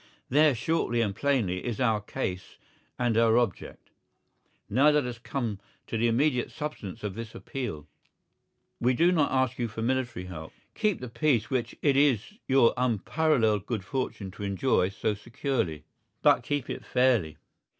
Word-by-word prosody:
There, 150 0 +5
shortly 120 -1 0
and 100 -4 -1
plainly, 115 -11 0
is 120 -4 -3
our 110 -4 +2
case 95 -4 -5 0.4
and 120 -3 +1
our 115 0 +4
object. 120 -6 -2 0.8
Now 135 +8 +4
let 150 -2 +3
us 120 -2 -5
come 115 -5 -3 0.3
to - - -5
the 115 +1 +2
immediate 125 +2 +1
substance 135 - -6
of 105 -2 -3
this 115 +1 -7
appeal. 115 - -5 0.9
We 125 +1 +2
do 170 +6 +4
not 155 -5 +2
ask 130 -1 +1
you 120 - 0
for 110 0 -5
military 125 -6 -1
help. 80 -3 -8 0.2
Keep 210 - 0
the 125 - -5
peace 120 -1 +1
which 130 -3 -1
it 140 -3 +4
is 140 - +2
your 130 -3 +5
unparalleled 115 -3 +1
good 110 -6 -3
fortune 110 -6 -3
to 100 - -9
enjoy 100 -1 +1
so 105 +2 -1
securely. 105 - -3 0.4
But - - +5
keep 145 -3 -2
it - - -5
fairly. 120 - +2
120 Hz, 160 wpm, -28 LUFS, 105-135 Hz, 0.9 s, There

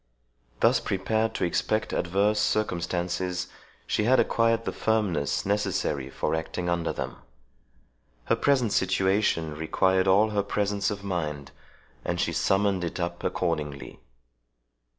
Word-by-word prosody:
Thus - - +5
prepared 110 +3 -1
to - - -1
expect 110 +5 0
adverse 100 +4 +1
circumstances, 90 -2 -1 0.4
she 105 - 0
had 130 +3 +5
acquired 115 0 +2
the - - -1
firmness 100 -10 0
necessary 95 -9 -1
for 70 - -2
acting 85 +2 -2
under 85 -1 0
them. - - -5 1.1
Her - - +2
present 130 -6 +2
situation 95 -4 +1
required 95 +4 +1
all 105 +3 +4
her 105 -1 +1
presence 100 0 -1
of 100 -1 -5
mind, 75 -7 -3 0.5
and - - -2
she - - 0
summoned 95 -1 +1
it 85 - -4
up 85 0 -3
accordingly. 75 -6 -3
95 Hz, 125 wpm, -27 LUFS, 85-105 Hz, 1.1 s, Thus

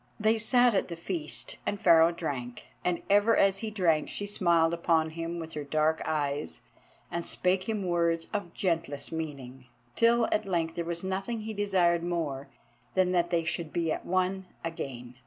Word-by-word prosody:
They 220 +1 +3
sat 245 +2 +4
at 190 - +1
the 170 - -5
feast 165 -2 -1
and 205 - -2
Pharaoh 165 -1 +6
drank. 130 -8 -5
And 180 -1 -1
ever 205 +3 +4
as 195 0 +3
he 220 - -3
drank 170 -7 +1
she 205 - -3
smiled 170 -5 +2
upon 165 -2 +1
him 165 +1 -4
with 160 -1 -7
her 150 - -4
dark 155 +2 +1
eyes 145 -1 -2 0.5
and 170 - -2
spake 185 +4 0
him 215 -3 -1
words 170 -1 +1
of 200 -5 -4
gentlest 165 -6 -2
meaning, 135 -5 -6 0.3
till 230 0 +4
at 210 - 0
length 165 -3 0
there 170 0 -3
was 170 +1 -4
nothing 195 +5 -3
he 220 +1 -5
desired 185 -5 +2
more 160 -6 -3 0.5
than 185 -1 +3
that 175 -1 +2
they 170 -1 +1
should 165 -1 -3
be 165 -2 0
at - - -3
one 185 +1 0 0.2
again. 125 -7 -6
170 Hz, 175 wpm, -29 LUFS, 160-195 Hz, 0.5 s, Pharaoh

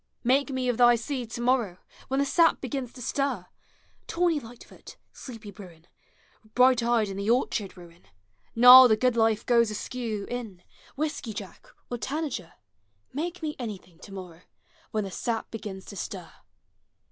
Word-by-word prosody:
Make 270 +4 +2
me 260 -1 -2
of 245 -2 0
thy 240 -1 +6
seed 240 0 -4
to 235 - -6
morrow, 240 -7 +1 0.3
When 270 +1 -1
the 280 - +2
sap 330 +4 +3
begins 260 -2 -4
to 250 - -9
stir! 265 -8 -1 0.6
Tawny 335 -2 +1
light 235 -1 -12
foot, - - -15 0.2
sleepy 225 -5 -10
bruin, 175 -4 -14 0.7
Bright 250 -1 +5
eyes 230 -3 +1
in 195 - -6
the 200 +2 -2
orchard 225 -5 0
ruin, 175 -1 -15 0.5
Gnarl 250 +2 +10
the 220 -2 +3
good 250 +1 +1
life 225 -2 +2
goes 235 -2 +3
askew 215 -1 -4
in, 225 -8 -6 0.3
Whiskey 285 -6 -3
jack, 195 -5 -9 0.2
or 240 - -3
tanager, 280 - -4 0.3
— 100 -1 -44
Make 350 +1 -5
me 300 -1 -3
anvthiug 190 -8 -8
to 200 - -12
morrow, 180 -3 -9 0.5
When 215 -1 -1
the 195 - -6
sap 225 +3 -3
begins 205 -4 -7
to 200 - -10
stir! - - -6
235 Hz, 165 wpm, -27 LUFS, 200-255 Hz, 0.7 s, Gnarl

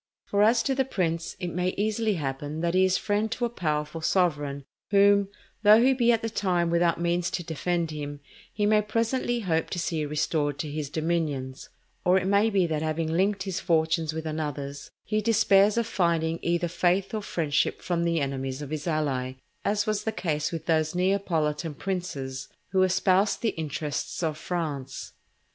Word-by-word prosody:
For, 200 - +1
as 225 +2 +4
to 270 - +1
the 265 0 +2
prince, 170 -9 -2
it 180 -2 -3
may 180 +1 -1
easily 215 +1 0
happen 145 +1 -4
that 170 0 0
he 185 0 +4
is 185 0 +2
friend 210 +1 -1
to 245 - -1
a - - -1
powerful 150 -5 -2
sovereign, 145 -6 0 0.2
whom, 200 0 +5 0.3
though 215 +1 +7
he 260 +3 +5
be 240 -2 +3
at 230 -1 +1
the 225 - -1
time 175 -5 0
without 170 -1 +2
means 175 0 0
to 175 - -3
defend 165 +1 -2
him, 145 -1 -5 0.3
he 210 - -1
may 210 0 +4
presently 230 +3 -1
hope 165 -5 0
to - - -4
see 165 -2 -1
restored 145 -1 0
to 150 0 -4
his 150 -2 -4
dominions; 155 -5 -2 0.3
or 180 +1 +4
it 185 - 0
may 200 +3 +3
be 195 -4 +2
that 155 -2 -1
having 160 0 -1
linked 195 +3 +1
his 190 -2 -3
fortunes 160 -2 +1
with 160 0 -5
another's, 145 -3 -4
he 215 0 -1
despairs 210 -1 +4
of 235 - +2
finding 165 -6 0
either 170 0 0
faith 180 +3 +1
or 215 - -1
friendship 155 -6 0
from 170 -1 -1
the 170 -1 +1
enemies 135 0 -3
of 145 - -8
his 155 +1 -4
ally, 140 -5 -1 0.3
as 205 0 +1
was 215 -1 -1
the 220 - -1
case 150 -7 -2
with 165 -2 -5
those 160 -1 +1
Neapolitan 170 -5 0
princes 140 -9 -4 0.2
who 190 0 +3
espoused 185 +2 +2
the 230 - +3
interests 150 0 -4
of 155 -2 0
France. 150 -5 -4
170 Hz, 185 wpm, -27 LUFS, 155-200 Hz, 0.3 s, though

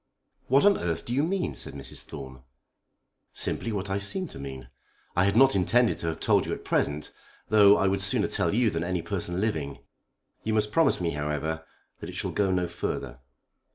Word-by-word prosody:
"What 135 +7 +4
on 205 -1 +5
earth 85 -2 -2
do 120 - -3
you 135 - +2
mean?" 180 - -1
said - - -5
Mrs. 70 -2 -5
Thorne. 65 -4 -9 0.9
"Simply 115 - +1
what 100 -2 -3
I 100 - 0
seem 185 - +1
to - - -10
mean. 65 -2 -7 0.5
I 90 - +3
had 100 +1 +1
not 135 -1 +6
intended 115 +6 +2
to 85 - -3
have 80 - -3
told - - +2
you - - -2
at - - -7
present, 75 +1 0 0.4
though 105 -1 +7
I - - +1
would 95 0 0
sooner 100 - +3
tell - - 0
you 115 -2 +3
than 80 -1 -2
any 90 -1 -2
person 90 -3 -3
living. 80 -10 -2 0.7
You 110 0 -1
must 105 -1 +1
promise 165 +5 +3
me, 85 -2 -1
however, 75 +2 -3 0.4
that - - -7
it - - -8
shall - - -3
go 100 -2 +1
no 90 -1 +1
further. - - -4
95 Hz, 200 wpm, -27 LUFS, 80-110 Hz, 0.9 s, though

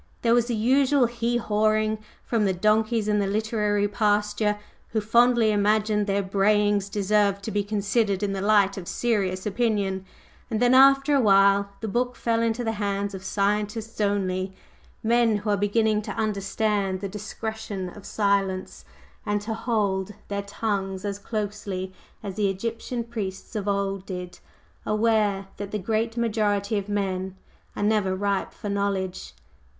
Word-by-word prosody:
There 230 -1 +4
was 240 -1 +3
the 240 - -1
usual 260 +4 +3
"hee 235 0 -1
hawing" 215 -1 +1 0.2
from 225 -3 0
the 190 - +2
donkeys 215 +3 +1
in 210 0 +2
the 200 - 0
literary 210 0 0
pasture, 210 0 +1 0.3
who 220 - 0
fondly 235 +1 +4
imagined 210 0 +2
their 200 0 +1
brayings 205 +1 +2
deserved 200 0 +1
to 220 - -4
be 205 -1 0
considered 205 0 0
in 200 -1 0
the 195 - -3
light 200 -1 +3
of 180 -3 -7
serious 195 -6 -1
opinion; 205 -3 0 0.5
and 220 -3 -1
then 245 +1 +4
after 275 +2 +6
a 275 - +4
while 200 -1 +5
the 220 - -3
book 245 +3 -1
fell 230 -1 0
into 230 +1 0
the 225 - 0
hands 200 0 -1
of 190 -1 -7
scientists 210 +3 -1
only, 190 -2 0 0.5
men 230 -1 +3
who 210 +1 -2
are - - +3
beginning 210 +1 +1
to - - -6
understand 205 -2 -1
the 200 - -3
discretion 210 -1 -5
of 195 +3 -11
silence, 195 -3 -1 0.4
and 205 -3 0
to 220 +2 -3
hold 210 -4 -1
their 200 0 -2
tongues 200 -1 -3
as 200 0 -3
closely 200 -3 -4 0.3
as 195 -1 -6
the 205 -2 +2
Egyptian 230 +4 -3
priests 215 -3 -6
of 210 -1 -3
old 195 -1 -1
did, 180 -2 -6 0.4
aware 215 -2 +1
that 205 -1 -5
the 210 - -2
great 225 +3 -1
majority 210 -2 0
of 200 +1 -8
men 190 -2 -2 0.4
are - - -2
never 205 -3 +2
ripe 200 0 -1
for 210 - -8
knowledge. 200 -2 -2
210 Hz, 155 wpm, -25 LUFS, 195-220 Hz, 0.5 s, after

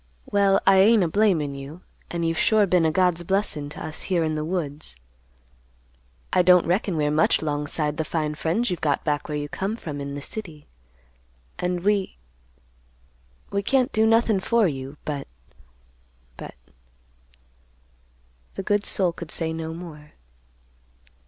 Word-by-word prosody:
Well, 200 -1 +3
I 195 0 +6
ain't 210 +1 +6
a - - +1
blamin' 165 -6 +2
you; 140 +5 -9 0.3
and 170 -1 -1
you've 165 0 -1
sure 215 -2 +4
been 180 -3 +3
a - - +1
God's 180 0 +2
blessin' 170 -6 -1
to - - -7
us 155 - -5
here 175 -3 +2
in 155 -1 -1
the 155 0 -2
woods. 155 -3 -4 1.4
I - - +5
don't 180 0 +5
reckon 180 0 0
we're 150 -1 +1
much 155 +1 +2
'long 145 -1 -2
'side 150 0 -2
the 160 - 0
fine 155 -1 -2
friends 180 +9 -1
you've 180 - -3
got 145 -3 0
back 150 -1 -1
where 150 - -2
you 145 0 -3
come 195 +8 -3
from 150 -10 -6
in 140 0 -5
the 145 - -5
city; 165 -9 -7 0.9
and 180 0 -1
we—we 60 - -6
can't 255 +4 +2
do 220 0 +3
nothin' 225 -2 +3
for 230 +2 +2
you, 135 -1 -5
but—but—" - - -11 2.0
The 195 - -4
good 205 +1 0
soul 185 -3 +1
could 170 -1 -9
say 160 0 -2
no 160 0 -4
more. 160 -3 -10
160 Hz, 150 wpm, -24 LUFS, 145-190 Hz, 2.0 s, I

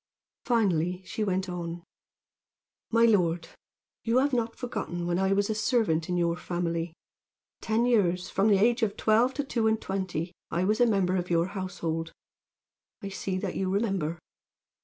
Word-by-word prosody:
Finally 185 -6 +1
she 215 - -3
went 190 -1 0
on: 170 -1 -5 1.1
"My 230 0 +4
lord, 175 -6 +2 0.5
you 230 +2 +2
have 275 +2 +2
not 235 -2 0
forgotten 215 -8 -4
when 175 +1 0
I 190 0 +2
was 200 +1 +2
a 220 - 0
servant 215 -8 +1
in 180 - 0
your 170 -1 +1
family. 170 -2 -3 0.7
Ten 225 +2 +1
years 185 -7 +2
from 195 +2 +1
the 205 -2 +5
age 235 +4 +3
of 215 -3 0
twelve 230 +4 +3
to 285 - -1
two 235 -5 0
and 220 0 +2
twenty 185 -4 -3 0.2
I 175 - 0
was 215 +5 +1
a 245 - +6
member 190 -4 +2
of 180 0 -3
your 170 +1 +2
household. 165 -4 -3 0.9
I 200 - -4
see 190 -1 -3
that 185 -1 -3
you 190 -1 -1
remember. 195 -5 0
190 Hz, 165 wpm, -28 LUFS, 175-220 Hz, 1.1 s, a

